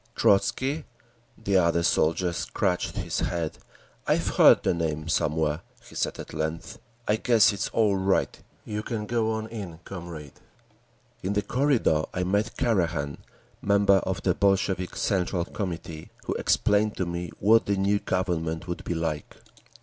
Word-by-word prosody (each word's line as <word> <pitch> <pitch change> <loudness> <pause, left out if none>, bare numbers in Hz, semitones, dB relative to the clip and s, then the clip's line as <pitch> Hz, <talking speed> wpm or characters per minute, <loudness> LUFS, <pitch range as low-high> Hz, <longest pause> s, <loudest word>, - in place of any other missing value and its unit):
"Trotzky?" 135 +9 +2 0.5
The 100 -3 +1
other 85 -1 +3
soldier 85 +1 +2
scratched 90 +1 -1
his - - -2
head. 85 -3 -2 0.5
"I've - - +2
heard - - +6
the - - +2
name 80 -2 -2
somewhere," 80 0 0 0.3
he - - -14
said - - -2
at - - -9
length. 80 +1 -4 0.3
"I 105 - +3
guess 115 -2 +4
it's 100 - -2
all 105 -3 +2
right. 95 0 0 0.2
You 105 0 -3
can 110 -1 -4
go 110 0 0
on 110 0 -3
in, 100 -8 -7
comrade…." 85 -6 -8 0.8
In 95 +2 -1
the 105 0 0
corridor 125 - +2
I 90 - 0
met 100 +5 0
Karakhan, 85 - 0 0.4
member 100 -1 +4
of - - -2
the - - +3
Bolshevik 95 -2 +1
Central 90 -3 0
Committee, 85 -5 -6 0.2
who - - -1
explained 105 +1 +2
to 95 - 0
me 85 0 -4
what 110 +3 +4
the 100 -1 +1
new 100 +1 +2
Government 85 -3 -2
would 85 - -4
be 85 - -3
like. 80 -3 -3
95 Hz, 150 wpm, -26 LUFS, 85-105 Hz, 0.8 s, heard